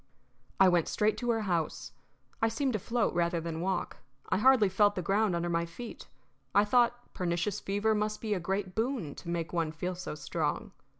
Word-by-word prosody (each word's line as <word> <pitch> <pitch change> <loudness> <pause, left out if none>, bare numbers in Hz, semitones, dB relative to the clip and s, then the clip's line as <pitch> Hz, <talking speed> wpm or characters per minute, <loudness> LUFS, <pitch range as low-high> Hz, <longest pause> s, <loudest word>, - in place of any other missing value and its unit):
I 190 - +8
went 175 -3 +3
straight 215 0 +1
to 240 - -2
her 225 -1 +2
house. 170 -6 -2 0.5
I 225 - +4
seemed 255 +4 0
to 215 - 0
float 230 +3 0
rather 170 0 +1
than 165 0 -4
walk; 185 0 -2 0.3
I - - +2
hardly 255 -3 +6
felt 205 +2 +3
the 180 - -2
ground 200 +1 +2
under 170 0 -1
my 170 0 0
feet; 225 +8 -9 0.5
I 205 +1 +6
thought 240 +2 +2
pernicious 175 +3 -1
fever 205 +3 +1
must 215 0 -1
be 215 -2 -1
a 195 - -1
great 190 +1 -2
boon 225 - -1
to 170 - -9
make 170 0 -2
one 165 -2 0
feel 180 +3 -3
so 180 -3 -6
strong. 150 - -2
195 Hz, 195 wpm, -30 LUFS, 170-220 Hz, 0.5 s, I